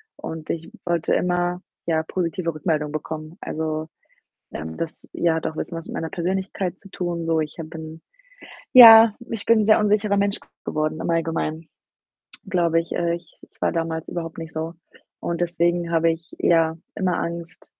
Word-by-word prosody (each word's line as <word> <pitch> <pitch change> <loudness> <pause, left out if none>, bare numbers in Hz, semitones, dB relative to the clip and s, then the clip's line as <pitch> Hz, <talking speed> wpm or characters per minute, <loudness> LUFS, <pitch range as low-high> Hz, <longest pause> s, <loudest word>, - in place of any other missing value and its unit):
Und 160 -1 -7
ich 165 0 -4
wollte 170 -2 +1
immer, 175 0 0 0.3
ja, 160 -1 +1
positive 170 -1 -2
Rückmeldungen 155 -1 -1
bekommen. 155 +2 -6
Also, 155 0 -3 0.7
ähm, 80 +1 -6
das, 165 -1 -6
ja, 165 -2 +2
hat 160 - -2
auch 155 - -9
bisschen 165 - -4
was 165 - -7
mit - - -7
meiner 160 - -3
Persönlichkeit 185 +1 -2
zu 195 - -15
tun 170 -3 -3
so. 165 -1 +2
Ich 150 +1 -5
habe 160 -1 -6
bin 160 0 -8 0.7
ja, 225 -3 +11 0.2
ich 225 -3 -4
bin 230 -1 +5
'n 210 - +1
sehr 215 0 +6
unsicherer 210 -1 +2
Mensch 200 0 +1
g - - -22 0.2
geworden 155 +1 -1
im - - -3
Allgemeinen, 165 -1 -1 0.8
glaube 170 -3 +2
ich. 165 - -8
Äh, 170 0 0
ich 170 - -11
ich - - -34
war - - +3
damals 165 -1 -2
überhaupt 165 -1 -5
nicht 165 -1 -7
so 160 +1 -3 0.5
und 170 0 -3
deswegen 175 0 0
habe 165 0 +4
ich, 165 +1 -5
ja, 165 -1 +3 0.2
immer 185 -2 0
Angst 170 0 -5
165 Hz, 180 wpm, -23 LUFS, 160-180 Hz, 0.8 s, ja